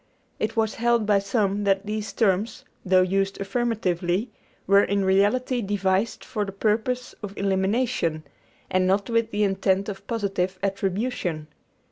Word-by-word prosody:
It 215 +1 -2
was 220 -1 +1
held 235 -2 +3
by 205 -1 +4
some 200 0 0
that 195 0 +2
these 215 0 -3
terms, 220 +5 0 0.2
though 185 0 +4
used 195 +1 0
affirmatively, 195 -2 -1 0.3
were 200 +1 +6
in 200 -1 0
reality 210 +6 +2
devised 195 +1 0
for 215 -4 -2
the 195 - -5
purpose 220 +5 -1
of 200 -1 -7
elimination, 195 -4 0 0.5
and 185 0 +2
not 200 +5 +1
with 230 -1 +2
the 210 -1 0
intent 195 0 +1
of 200 0 -8
positive 195 -4 -1
attribution. 195 -5 -2
200 Hz, 140 wpm, -25 LUFS, 190-225 Hz, 0.5 s, were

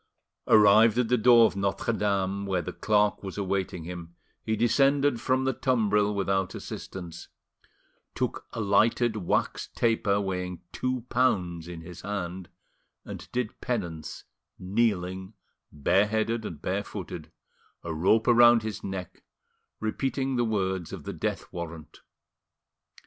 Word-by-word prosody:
Arrived 110 +2 +6
at 125 -2 +1
the 125 - +4
door 120 0 +7
of - - 0
Notre 100 +4 -1
Dame, 100 -2 -1
where 90 -2 0
the - - -6
clerk 105 -2 +1
was 95 -1 -7
awaiting 95 -3 -2
him, 85 0 -8 0.3
he 110 - -1
descended 135 +3 +2
from 130 0 +1
the 130 0 +1
tumbril 105 -6 +1
without 95 -1 0
assistance, 85 -3 -8 0.9
took - - -3
a - - -6
lighted 110 +3 +2
wax 90 -5 -1
taper 110 -4 +2
weighing 90 -3 -4
two 130 -1 -2
pounds 90 -10 +1
in 85 -1 -7
his 85 +1 -10
hand, 95 -3 -5 0.6
and - - -9
did 125 -3 -3
penance, 85 -11 -4 0.3
kneeling, 95 -1 -1 0.4
bareheaded 105 +8 +1
and 75 -7 -7
barefooted, 90 -4 -4 0.5
a 80 - -4
rope 95 +8 +3
round 120 -1 +6
his 110 -1 -5
neck, 95 -3 -6 0.6
repeating 135 +4 -1
the 120 - +2
words 95 -6 -1
of - - -7
the - - -5
death - - -3
warrant. 85 -2 -8
100 Hz, 130 wpm, -27 LUFS, 90-115 Hz, 0.9 s, door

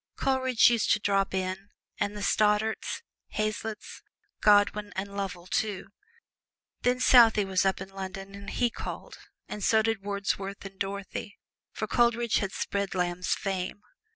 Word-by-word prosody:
Coleridge 260 -3 +3
used 235 -3 +2
to - - +1
drop 195 -1 +1
in, 190 +1 -3 0.3
and 205 0 -1
the 205 - -4
Stoddarts, 215 - +1 0.3
Hazlitts, 215 +1 -3 0.4
Godwin 205 0 +4
and 200 +1 -4
Lovell, 190 -3 -4
too. 200 +1 -2 0.9
Then 250 0 +2
Southey 230 -5 +6
was 190 0 +2
up 190 - 0
in 190 0 -7
London 195 0 -7
and 200 0 -8
he 240 -1 +1
called, - - -7 0.3
and 210 - -6
so 220 -1 +4
did 225 -2 0
Wordsworth 200 0 -3
and 195 0 -10
Dorothy, 200 +1 -5 0.3
for - - -3
Coleridge 235 -1 +2
had 195 -1 -2
spread 200 0 -2
Lamb's 180 0 0
fame. 195 +1 -3
200 Hz, 145 wpm, -28 LUFS, 195-220 Hz, 0.9 s, Southey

